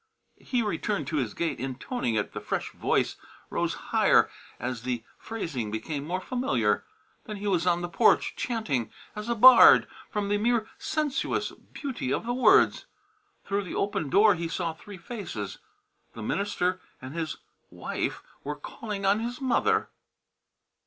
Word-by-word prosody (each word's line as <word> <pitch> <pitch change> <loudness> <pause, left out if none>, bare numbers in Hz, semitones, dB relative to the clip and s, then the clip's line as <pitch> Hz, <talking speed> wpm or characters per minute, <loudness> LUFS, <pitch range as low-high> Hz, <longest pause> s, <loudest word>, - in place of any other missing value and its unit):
He 245 -3 0
returned 205 +1 -1
to 155 - -1
his 125 -7 -2
gate, 170 -1 -2
intoning 130 - -3
it; 105 - -1
the - - -5
fresh - - -3
voice - - 0 0.3
rose - - 0 0.2
higher - - +5 0.3
as 120 -1 -3
the 120 -2 -3 0.2
phrasing 150 - -4
became 140 +7 -4
more 180 +2 -1
familiar. 130 - 0 0.4
Then 215 - -6
he 200 - -7
was 180 -3 +1
on 175 -1 +3
the 175 - -2
porch, - - +3
chanting 150 - -2 0.2
as 210 +2 -5
a 235 - +1
bard 260 - +9 0.2
from 210 -2 -2
the 205 0 +2
mere 230 0 +1
sensuous 305 -3 -1
beauty 260 - -6
of - - -1
the 240 - -1
words. 370 - +4 0.6
Through 200 +1 -1
the - - -6
open 195 -7 -1
door 205 +6 +6
he 170 -1 -3
saw 165 0 -2
three 195 +5 -11
faces. 170 - -6 0.5
The 115 - -7
minister 185 - -1 0.2
and 130 +2 -8
his 165 -1 -3 0.3
wife - - -4 0.2
were 150 +1 -3
calling 200 +7 -6
on 200 +2 +4
his 240 +2 -4
mother. 435 - +1
195 Hz, 155 wpm, -27 LUFS, 145-230 Hz, 0.6 s, bard